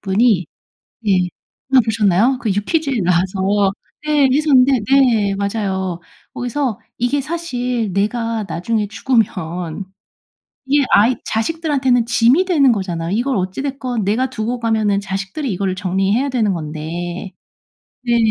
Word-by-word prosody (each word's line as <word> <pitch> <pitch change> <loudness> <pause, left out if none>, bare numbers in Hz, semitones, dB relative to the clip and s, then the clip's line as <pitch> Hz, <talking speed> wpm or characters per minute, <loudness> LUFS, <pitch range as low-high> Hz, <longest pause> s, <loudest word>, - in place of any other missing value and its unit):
그분이 195 -3 +2 0.6
예. 195 - +4 0.6
아 255 - +8
보셨나요? 220 +3 +2
그 225 - -1
유퀴즈에 275 - 0
나와서 190 +3 +1 0.3
네 295 -3 +3
했었는데 270 -4 +4
네 230 -7 +4
맞아요. 190 -3 -2 0.3
거기서 245 -2 -2 0.2
이게 245 +4 +1
사실 250 - -3
내가 225 +2 -1
나중에 210 +6 -1
죽으면 190 -6 -1 0.8
이게 280 +1 +3
아이 235 +5 +5
자식들한테는 265 -1 0
짐이 255 +11 +3
되는 280 -9 +4
거잖아요. 175 -5 -3
이걸 245 +3 0
어찌 185 +5 -2
됐건 255 -6 -3
내가 235 +6 0
두고 235 +2 -3
가면은 220 -3 +1
자식들이 195 +7 -4
이거를 190 0 -1
정리해야 195 +8 0
되는 220 -7 +1
건데 170 +4 -5 0.7
네. 235 -1 +2
220 Hz, 290 characters per minute, -18 LUFS, 190-255 Hz, 0.8 s, 아